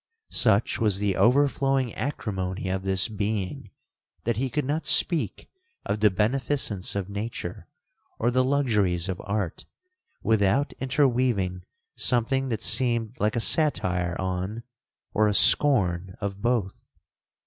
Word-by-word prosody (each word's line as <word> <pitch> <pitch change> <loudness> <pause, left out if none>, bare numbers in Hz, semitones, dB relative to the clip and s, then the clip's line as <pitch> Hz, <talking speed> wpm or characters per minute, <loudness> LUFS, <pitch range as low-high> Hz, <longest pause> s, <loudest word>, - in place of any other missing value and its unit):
(Such 110 +1 +1
was 105 -4 +1
the 100 -1 -1
over 140 +4 +4
flowing 135 -3 -1
acrimony 95 -8 -4
of 95 0 -2
this 95 -1 +2
being, 105 -3 -4 0.5
that 115 -2 -1
he 130 +2 -1
could 150 +3 -2
not 150 +4 -2
speak 170 -4 +2 0.4
of 105 - -2
the 105 0 +4
beneficence 110 -1 0
of 100 -2 -3
nature, 100 -3 -6 0.5
or 120 +2 0
the 130 +1 +2
luxuries 105 -11 0
of 95 -2 -4
art, 100 -4 -3 0.6
without 110 +5 +1
interweaving 125 -9 0 0.3
something 130 +2 0
that 110 -2 -3
seemed 115 0 +2
like 105 +2 0
a - - 0
satire 90 - +1
on, 95 +4 -4 0.5
or 110 0 +2
a 105 - 0
scorn 95 -12 +5
of 100 -1 -5
both.) 115 -5 -1
110 Hz, 130 wpm, -25 LUFS, 95-130 Hz, 0.6 s, scorn